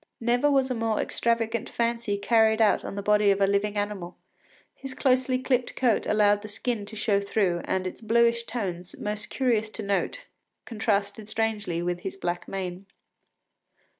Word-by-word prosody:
Never 245 Hz, +5 st, +2 dB
was 270 Hz, -2 st, +2 dB
a -, -, +2 dB
more 225 Hz, -2 st, -1 dB
extravagant 230 Hz, -1 st, 0 dB
fancy 230 Hz, -3 st, -1 dB
carried 220 Hz, +1 st, +3 dB
out 220 Hz, -2 st, +3 dB
on -, -, -6 dB
the 200 Hz, -, -4 dB
body 210 Hz, 0 st, +4 dB
of 195 Hz, 0 st, +3 dB
a 200 Hz, -, +5 dB
living 200 Hz, +1 st, 0 dB
animal; 205 Hz, -4 st, -3 dB, 0.6 s
his 270 Hz, -1 st, -8 dB
closely 255 Hz, -1 st, +2 dB
clipped 255 Hz, -1 st, 0 dB
coat 245 Hz, -4 st, +1 dB
allowed 205 Hz, -1 st, +3 dB
the 215 Hz, -, -8 dB
skin 215 Hz, 0 st, -3 dB
to 220 Hz, -, -8 dB
show 205 Hz, -2 st, +1 dB
through, 195 Hz, -4 st, 0 dB
and 190 Hz, 0 st, -1 dB
its 185 Hz, -, -6 dB
bluish 235 Hz, +1 st, +2 dB
tones, 185 Hz, -7 st, -5 dB
most 210 Hz, 0 st, -4 dB
curious 230 Hz, -5 st, +1 dB
to 215 Hz, 0 st, -6 dB
note, 200 Hz, -, -1 dB, 0.4 s
contrasted 210 Hz, -2 st, -1 dB
strangely 215 Hz, -6 st, -1 dB
with 175 Hz, 0 st, -2 dB
his 195 Hz, +2 st, -6 dB
black 175 Hz, -2 st, -3 dB
mane. 190 Hz, 0 st, -5 dB
215 Hz, 165 wpm, -26 LUFS, 200-235 Hz, 0.6 s, a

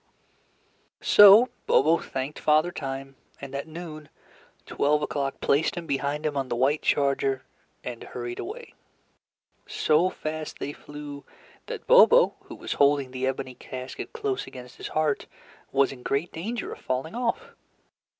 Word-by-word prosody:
So 205 Hz, +4 st, +8 dB, 0.2 s
Bobo 160 Hz, +4 st, +4 dB
thanked 135 Hz, +3 st, -5 dB
Father 155 Hz, +3 st, +3 dB
Time, 135 Hz, -4 st, -6 dB, 0.2 s
and 140 Hz, -1 st, -9 dB
at 140 Hz, +2 st, -4 dB
noon, 155 Hz, -2 st, -9 dB, 0.6 s
Twelve 150 Hz, +1 st, +1 dB
O'Clock 140 Hz, -2 st, -2 dB
placed 145 Hz, +3 st, +2 dB
him 170 Hz, -, -4 dB
behind 145 Hz, +1 st, -2 dB
him 150 Hz, -1 st, -1 dB
on 135 Hz, -2 st, -2 dB
the -, -, -1 dB
white 135 Hz, +5 st, +2 dB
charger, 135 Hz, -2 st, +1 dB, 0.4 s
and 120 Hz, -2 st, -6 dB
hurried 120 Hz, 0 st, -6 dB
away. 460 Hz, +4 st, -7 dB, 0.9 s
So 160 Hz, +4 st, +2 dB
fast 155 Hz, -2 st, -5 dB
they 145 Hz, -, -5 dB
flew 145 Hz, -1 st, -9 dB, 0.4 s
that -, -, -6 dB
Bobo, -, -, +7 dB
who -, -, -9 dB
was -, -, -4 dB
holding 140 Hz, -2 st, +3 dB
the 130 Hz, 0 st, -2 dB
ebony 130 Hz, -1 st, -3 dB
casket 130 Hz, +1 st, -8 dB
close 420 Hz, -4 st, -3 dB
against 125 Hz, 0 st, -11 dB
his -, -, -6 dB
heart, 155 Hz, -2 st, 0 dB, 0.4 s
was 135 Hz, 0 st, +3 dB
in 130 Hz, -2 st, -10 dB
great 140 Hz, +7 st, -1 dB
danger 220 Hz, +8 st, -4 dB
of -, -, -12 dB
falling 130 Hz, +5 st, -3 dB
off. 240 Hz, 0 st, -2 dB
145 Hz, 145 wpm, -26 LUFS, 135-165 Hz, 0.9 s, So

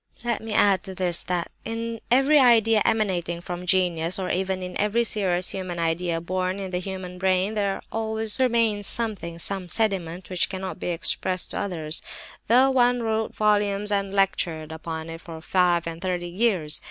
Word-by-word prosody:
"Let 235 Hz, -2 st, 0 dB
me 225 Hz, 0 st, -7 dB
add 200 Hz, -3 st, +3 dB
to 190 Hz, -, -6 dB
this 180 Hz, -2 st, +1 dB
that 175 Hz, -1 st, -3 dB
in 230 Hz, 0 st, -4 dB
every 270 Hz, +4 st, +5 dB
idea 225 Hz, -4 st, +5 dB
emanating 185 Hz, -6 st, 0 dB
from 175 Hz, +1 st, -6 dB
genius, 175 Hz, -2 st, +2 dB
or 185 Hz, -2 st, -2 dB
even 190 Hz, 0 st, -1 dB
in 180 Hz, 0 st, -6 dB
every 210 Hz, +3 st, +2 dB
serious 185 Hz, -5 st, 0 dB
human 185 Hz, -2 st, -5 dB
idea—born 175 Hz, +2 st, -1 dB
in 195 Hz, -2 st, -5 dB
the 180 Hz, -, -1 dB
human 185 Hz, -1 st, -6 dB
brain—there 195 Hz, +2 st, 0 dB
always 220 Hz, 0 st, +1 dB
remains 230 Hz, -5 st, +2 dB
something—some 190 Hz, -4 st, -2 dB
sediment—which 185 Hz, -4 st, -1 dB
cannot 190 Hz, -1 st, -5 dB
be -, -, -4 dB
expressed 180 Hz, +1 st, 0 dB
to -, -, -3 dB
others, 160 Hz, -5 st, -2 dB, 0.5 s
though 255 Hz, +4 st, +5 dB
one 245 Hz, -2 st, +3 dB
wrote 220 Hz, 0 st, -1 dB
volumes 210 Hz, -1 st, +2 dB
and 200 Hz, -1 st, 0 dB
lectured 170 Hz, -5 st, 0 dB
upon 160 Hz, 0 st, -6 dB
it 165 Hz, 0 st, -8 dB
for 165 Hz, -2 st, -9 dB
five 175 Hz, 0 st, +2 dB
and 165 Hz, 0 st, -5 dB
thirty 180 Hz, -2 st, -2 dB
years. 180 Hz, -6 st, +1 dB
190 Hz, 160 wpm, -25 LUFS, 175-215 Hz, 0.5 s, every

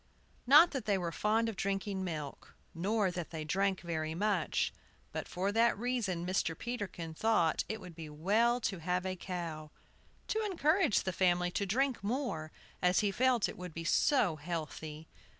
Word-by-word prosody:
NOT 300 Hz, +6 st, +8 dB
that 270 Hz, -6 st, -4 dB
they 200 Hz, -2 st, +2 dB
were 175 Hz, -2 st, -2 dB
fond 220 Hz, +5 st, +1 dB
of 225 Hz, -, -3 dB
drinking 195 Hz, 0 st, -2 dB
milk, 155 Hz, -6 st, -6 dB, 0.2 s
nor 195 Hz, +3 st, +1 dB
that 175 Hz, -2 st, -5 dB
they 160 Hz, -2 st, -5 dB
drank 195 Hz, +4 st, +1 dB
very 160 Hz, -2 st, -3 dB
much. 195 Hz, -3 st, 0 dB, 0.4 s
But -, -, -4 dB
for 190 Hz, +3 st, -1 dB
that 230 Hz, +1 st, +3 dB
reason 215 Hz, -7 st, -1 dB
Mr. 180 Hz, -3 st, 0 dB
Peterkin 195 Hz, -9 st, -5 dB
thought 175 Hz, -3 st, +2 dB
it 220 Hz, 0 st, -3 dB
would 180 Hz, -3 st, -10 dB
be 160 Hz, -1 st, -8 dB
well 215 Hz, +11 st, +2 dB
to 195 Hz, -5 st, -2 dB
have 180 Hz, +3 st, -1 dB
a 185 Hz, 0 st, -2 dB
cow, 170 Hz, -4 st, -5 dB, 0.6 s
to 440 Hz, 0 st, 0 dB
encourage 345 Hz, -, +2 dB
the 185 Hz, -, -2 dB
family 180 Hz, 0 st, +2 dB
to 200 Hz, +2 st, -1 dB
drink 255 Hz, +3 st, 0 dB
more, 205 Hz, -, -2 dB, 0.3 s
as 180 Hz, 0 st, +4 dB
he 205 Hz, -2 st, +1 dB
felt 250 Hz, +1 st, +3 dB
it 210 Hz, -, -8 dB
would 180 Hz, -3 st, -7 dB
be 165 Hz, -, -4 dB
so 180 Hz, -, +3 dB
healthy. 155 Hz, -1 st, -5 dB
190 Hz, 170 wpm, -33 LUFS, 170-225 Hz, 0.6 s, NOT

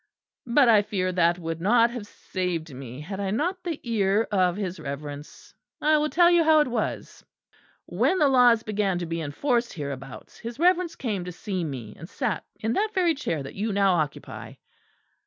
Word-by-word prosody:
But 250 Hz, +2 st, +4 dB
I 220 Hz, -3 st, +6 dB
fear 195 Hz, -3 st, -2 dB
that 175 Hz, -1 st, +2 dB
would 165 Hz, -1 st, -5 dB
not 230 Hz, +5 st, +4 dB
have 235 Hz, -4 st, -7 dB
saved 175 Hz, -7 st, -4 dB
me, 130 Hz, +1 st, -8 dB
had 190 Hz, +5 st, -6 dB
I 200 Hz, -1 st, -1 dB
not 350 Hz, -, -1 dB
the 335 Hz, -4 st, -3 dB
ear 215 Hz, -2 st, +1 dB
of 185 Hz, -3 st, +2 dB
his 190 Hz, -3 st, -4 dB
Reverence. 145 Hz, 0 st, -8 dB, 0.3 s
I 310 Hz, +1 st, +3 dB
will 305 Hz, 0 st, 0 dB
tell 345 Hz, +1 st, +5 dB
you 345 Hz, -1 st, +5 dB
how 315 Hz, -1 st, +5 dB
it 295 Hz, -, +3 dB
was. 235 Hz, -3 st, -4 dB, 0.6 s
When 375 Hz, -, +1 dB
the 300 Hz, -, +4 dB
laws 245 Hz, -4 st, +5 dB
began 205 Hz, -4 st, 0 dB
to 175 Hz, -, -3 dB
be 165 Hz, 0 st, -3 dB
enforced 235 Hz, -, -1 dB
hereabouts, 135 Hz, -4 st, -7 dB
his 235 Hz, 0 st, -7 dB
Reverence 355 Hz, +1 st, +2 dB
came 210 Hz, -8 st, -3 dB
to 180 Hz, -, -5 dB
see 185 Hz, +1 st, -4 dB
me; 125 Hz, -9 st, -6 dB
and 165 Hz, +4 st, -11 dB
sat 245 Hz, -8 st, -2 dB, 0.2 s
in 220 Hz, +1 st, -1 dB
that 425 Hz, -, 0 dB
very 355 Hz, -3 st, +3 dB
chair 165 Hz, -, -3 dB
that 135 Hz, -, -8 dB
you 210 Hz, +3 st, -2 dB
now 195 Hz, -1 st, +3 dB
occupy. 155 Hz, -5 st, -4 dB
200 Hz, 190 wpm, -25 LUFS, 165-250 Hz, 0.6 s, I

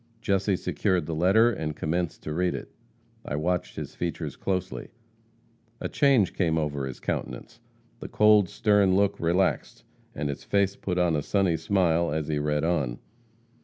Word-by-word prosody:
Jesse 100 Hz, -1 st, +1 dB
secured 90 Hz, 0 st, -1 dB
the 80 Hz, -, -4 dB
letter, 95 Hz, +9 st, +4 dB
and 75 Hz, -8 st, -4 dB
commenced 85 Hz, +2 st, -2 dB
to 75 Hz, -, -4 dB
read 90 Hz, +2 st, 0 dB
it. -, -, -8 dB, 0.5 s
I 75 Hz, -, -4 dB
watched 90 Hz, +4 st, -1 dB
his -, -, -6 dB
features 85 Hz, -3 st, -4 dB
closely. 90 Hz, -10 st, -3 dB, 0.9 s
A -, -, -3 dB
change 135 Hz, -9 st, +3 dB
came 80 Hz, -4 st, +1 dB
over 75 Hz, -3 st, -2 dB
his 65 Hz, -, -8 dB
countenance. 60 Hz, -, -5 dB, 0.4 s
The -, -, -7 dB
cold, 105 Hz, -3 st, +4 dB
stern 105 Hz, -3 st, +3 dB
look 100 Hz, 0 st, +1 dB
relaxed, 85 Hz, -7 st, 0 dB, 0.3 s
and 75 Hz, -, -2 dB
his 70 Hz, -, -5 dB
face 100 Hz, -1 st, +1 dB
put 90 Hz, -2 st, -3 dB
on 90 Hz, -2 st, +2 dB
a 75 Hz, -, 0 dB
sunny 95 Hz, +1 st, +1 dB
smile 85 Hz, -1 st, +1 dB
as 75 Hz, 0 st, -2 dB
he 75 Hz, -1 st, 0 dB
read 75 Hz, 0 st, 0 dB
on. 75 Hz, -8 st, 0 dB
85 Hz, 165 wpm, -26 LUFS, 75-95 Hz, 0.9 s, letter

